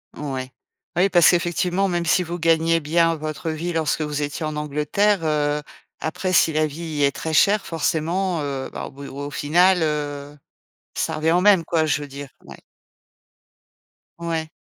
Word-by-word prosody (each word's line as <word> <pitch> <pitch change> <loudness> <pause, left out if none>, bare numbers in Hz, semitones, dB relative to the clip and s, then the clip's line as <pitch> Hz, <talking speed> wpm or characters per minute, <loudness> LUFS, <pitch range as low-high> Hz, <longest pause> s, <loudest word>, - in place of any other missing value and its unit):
Ouais. 130 -3 -5 0.4
Bah 175 - +2
oui, 195 - +4
parce 175 -4 +6
qu'effectivement, 175 +2 0
même 175 -2 -1
si 180 +2 +3
vous 175 0 -4
gagnez 165 0 +2
bien 165 +2 +2
votre 155 +1 -5
vie 165 +2 -3
lorsque 160 -1 0
vous 150 -1 -2
étiez 145 +2 -3
en 155 0 -3
Angleterre, 150 +7 0
heu, 150 -1 0 0.4
après, 185 +3 -2
si 160 -3 +4
la 155 0 +2
vie 155 0 -5
est 140 - +4
très 160 -1 -4
chère, 200 +6 +4
forcément, 165 +2 -1
heu, 135 -2 -4
bah, - - -6
au - - -9
bout 140 +1 -10
au 145 +1 -6
final, 175 +5 +3
heu, 145 -1 -3 0.6
ça - - -1
revient 160 +1 +1
au 175 +1 +3
même, 195 -4 +5
quoi, 160 -2 +1
je 145 0 0
veux 145 - -6
dire. 140 0 -9
Ouais. - - -12 1.6
Ouais. 165 -2 -3
160 Hz, 175 wpm, -22 LUFS, 150-175 Hz, 1.6 s, parce